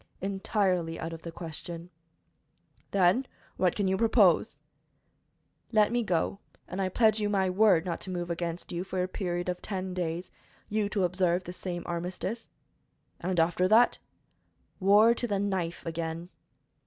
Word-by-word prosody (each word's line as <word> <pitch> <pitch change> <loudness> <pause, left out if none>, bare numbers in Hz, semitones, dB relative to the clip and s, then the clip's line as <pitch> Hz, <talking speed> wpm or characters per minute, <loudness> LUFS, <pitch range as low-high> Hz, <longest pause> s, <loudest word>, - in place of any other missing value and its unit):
"Entirely 190 -3 0
out 165 0 -4
of 165 - -8
the 165 - -7
question." 170 +1 -7 1.0
"Then, 195 +7 +3 0.3
what 180 -2 +2
can 200 -2 0
you 190 0 +1
propose?" 225 +2 +4 1.1
"Let 215 -1 +4
me 240 0 +1
go, 190 -1 0 0.3
and 185 +2 -4
I 190 - 0
pledge 220 +2 +3
you 210 -1 0
my 190 -2 +1
word 190 -3 +4
not 170 -2 -3
to - - -5
move 175 -1 -3
against 170 0 -4
you 175 +1 -2
for 185 -1 -2
a - - -1
period 175 -2 -3
of 180 0 -2
ten 190 -2 -4
days, 175 0 -3 0.4
you 210 -1 0
to 205 -2 0
observe 180 0 +1
the 175 - -7
same 175 -1 -5
armistice." 180 +6 -4 0.7
"And 180 0 -1
after 175 +2 +3
that?" 225 +5 +5 0.8
"War 205 +4 +6
to 240 +1 -2
the 205 -3 0
knife 190 -4 -2
again!" 165 +1 -4
185 Hz, 155 wpm, -29 LUFS, 175-200 Hz, 1.1 s, War